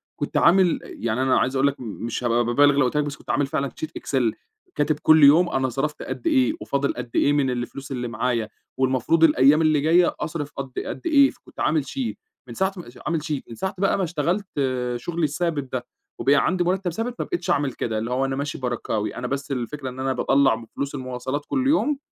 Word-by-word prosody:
كنت - - -3
عامل 180 -1 +4
أ - - -11
يعني 115 +2 -3
أنا 130 0 +3
عايز 130 +2 0
أقول 135 +1 +3
لك 140 - -2
م - - -7 0.2
مش 120 +1 -3
هابقى 120 0 +2
بابالغ 145 +4 +4
لو 140 - +5
قُلت 125 +4 -1
لك 150 - +3
بس 145 -1 -4
كنت - - -19
عامل 145 - +2
فعلًا 140 -2 -1
sheet 155 - -3
excel. 120 -5 0 0.4
كاتب 150 0 0
كل 155 -1 +6
يوم 160 +5 +7
أنا 130 -1 0
صرفت 140 +4 -3
قد 335 - -5
إيه، 290 -1 +3
وفاضل 140 0 -1
قد 120 - -6
إيه 145 - +3
من 140 -3 +2
الفلوس 125 +3 -5
اللي 125 -2 -3
معايا، 115 -1 -1 0.3
والمفروض 130 +5 +2
الأيام 150 0 +5
اللي 155 -2 +3
جاية 170 +3 +3
أصرف 150 -1 -4
قد 135 -1 -5
قد - - -5
إيه 280 -4 +5
فكنت - - -16
عامل 155 -3 +1
sheet. 255 - -3 0.3
من - - -8
ساعة 190 0 0
م 175 - -6 0.2
عامل 165 -3 0
sheet. 150 -3 -2
من 115 - -8
ساعة 190 - -3
بقى 195 +1 +2
ما 195 - 0
اشتغلت 175 +4 -1 0.5
شغلي 170 +7 -3
الثابت 150 -3 -1
ده، 125 -1 -2 0.3
وبقى 140 - +4
عندي 180 +5 +2
مُرتَّب 180 0 0
ثابت، 230 +7 -3
ما - - -1
بقيتش 175 - -4
أعمل 140 -3 +1
كده. 110 -2 -3
اللي 115 +3 -3
هو 130 +2 +1
أنا 135 0 -2
ماشي 140 +1 -3
بركاوي. 120 -4 -2
أنا 125 0 -4
بس 140 +2 -4
الفكرة 130 +2 -4
إن 130 +1 -9
أنا 135 0 0
باطلّع 135 -1 +3
من 115 0 -9
فلوس 140 +5 -5
المواصلات 130 +2 -4
كل 265 -1 0
يوم 295 0 +2
140 Hz, 225 wpm, -23 LUFS, 130-165 Hz, 0.5 s, يوم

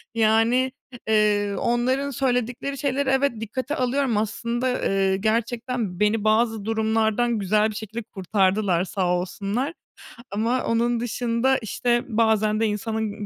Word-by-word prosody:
Yani, 225 +4 +3 0.2
h 245 - -10
eee, 205 -1 +2
onların 255 +4 0
söyledikleri 250 +1 -1
şeyleri 275 0 0
evet, 270 +1 +2
dikkate 255 +6 -3
alıyorum 255 -2 0
aslında, 235 +4 -1
ııı, 195 -5 +1
gerçekten 225 -1 -2
beni 210 0 +2
bazı 220 -1 +2
durumlardan 220 +1 +1
güzel 210 +2 +2
bir 215 - -7
şekilde 220 +2 -5
kurtardılar, 190 -2 +1
sağ 185 -1 -1
olsunlar. 200 - -2 0.6
Ama 230 +5 0
onun 235 +1 +1
dışında, 240 +2 0
işte, 240 +1 0
bazen 220 -2 +2
de 225 - +2
insanın 215 0 -3
225 Hz, 125 wpm, -24 LUFS, 210-245 Hz, 0.6 s, Yani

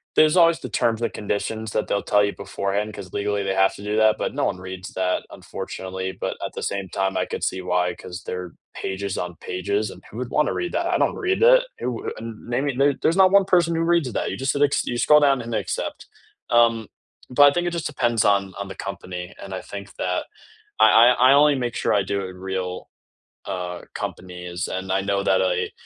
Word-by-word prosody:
there's 155 +3 +5
always 170 -1 +5
the - - -7
terms 115 -1 0
and 115 - 0
conditions 110 +1 -3
that - - -1
they'll 100 - 0
tell 105 -1 +3
you 100 - -1
beforehand 100 +2 -3
'cause 95 -3 -9
legally 105 0 -1
they 95 -1 -1
have 95 0 +3
to 100 - -11
do 105 +1 -1
that, 110 -1 +5
but - - -2
no - - +1
one - - -1
reads 95 +1 -8
that 90 -1 0
unfortunately, 95 0 -6
but - - -4
at - - -6
the - - -6
same 100 -1 -3
time, 95 +1 -1
I - - +1
could - - -5
see 95 - -1
why 90 0 0
'cause 90 +1 -9
they're 90 -2 -6 0.2
pages 95 0 -4
on 90 -1 -4
pages 100 +3 -2
and 90 - -12
who 110 - -9
would 125 0 -4
want 150 - +2
to - - -2
read 355 - -3
that? - - 0
I - - +1
don't - - +2
read 380 +3 -1
it. - - +7 0.2
It - - -3
wou 120 -2 -3
uh, - - -10
name 120 +4 -3
me 140 0 +2
there's 165 - +2
not 190 -1 +6
one 200 -1 +5
person 175 -3 +3
who 165 - 0
reads 165 -6 +2
that. - - -1
You - - -4
just 135 0 0
hit 140 - -2
acc 145 -1 +4
you 120 - -2
scroll 150 0 +6
down 140 -3 +3
and 115 -1 -4
accept. - - -3 0.5
Um, 115 -2 +4 0.4
but 145 +2 +7
I - - -1
think 175 +2 0
it 175 - -1
just 170 -2 -2
depends 120 -7 +1
on 100 -2 +2
on 100 - -4
the 95 - -8
company 90 -2 -6
and 95 - -9
I - - -5
think 100 -1 -9
that 90 0 -2 0.5
I 110 0 +7
I 125 +3 +6
I - - +8
only 145 0 +5
make 120 -2 -2
sure - - 0
I 100 - +3
do 100 +1 -2
it 95 - -5
in 90 - -11
real, 95 -1 -4 0.6
uh, 90 -1 -4
companies 90 -1 -5
and 95 0 -4
I 95 +1 +2
know 100 0 0
that 95 - +3
a, 90 -1 0
100 Hz, 240 wpm, -23 LUFS, 95-130 Hz, 0.6 s, I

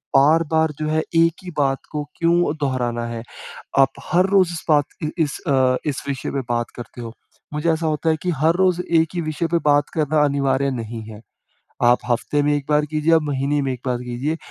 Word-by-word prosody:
बार-बार 160 +2 +4
जो 155 - -2
है 155 +1 +1 0.2
एक 165 0 +4
ही 180 - -7
बात 135 -2 +1
को 150 -1 -2
क्यों 170 -2 +2
दोहराना 120 -4 -1
है? 115 -1 -5 0.6
आप 135 0 +6 0.2
हर 180 +1 +4
रोज़ 190 -3 +4
इस 165 - -6
बात 145 -2 +4 0.2
इ 150 - 0
इस 145 - -4
अ, 130 -2 +3
इस 145 -3 -2
विषय 135 -2 -3
पे 140 - -1
बात 120 0 -1
करते 120 0 -9
हो। 115 -1 -7 0.4
मुझे 150 +3 0
ऐसा 160 0 -2
होता 155 +1 0
है 160 - +2
कि, 180 - -1
हर 160 +2 +2
रोज़ 180 -1 +2
एक 165 -2 +2
ही 170 - 0
विषय 155 +1 -2
पे 170 - +3
बात 145 0 +3
करना 155 -1 +2
अनिवार्य 140 -1 +1
नहीं 115 -2 -5
है। 105 0 -11 0.6
आप 120 +1 +5
हफ्ते 145 +5 +1
में 145 +1 +2
एक 145 - -4
बार 150 0 +3
कीजिए, 155 +2 0
आप 160 - +3
महीने 145 0 0
में 135 -1 -1
एक 125 - -7
बार 125 -1 0
कीजिए। 125 +6 -2
145 Hz, 215 wpm, -21 LUFS, 130-160 Hz, 0.6 s, आप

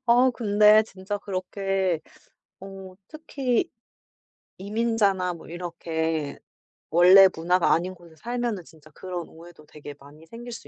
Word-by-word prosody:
어. 245 +2 +5
근데 215 -2 +4
진짜 200 -1 -6
그렇게 190 -2 -2 0.6
어 195 -1 -10
특히 290 -1 -2 0.9
이민자나 200 -3 0
뭐 170 - -13
이렇게 165 -3 -4 0.5
원래 180 +4 +7
문화가 175 +2 +2
아닌 180 +3 -1
곳에 170 -2 -18
살면은 235 -1 -4
진짜 155 -2 -19
그런 180 +1 -7
오해도 165 -1 -15
되게 145 -1 -11
많이 145 +3 -16
생길 240 +5 -10
수 235 - -10
185 Hz, 255 characters per minute, -25 LUFS, 170-215 Hz, 0.9 s, 원래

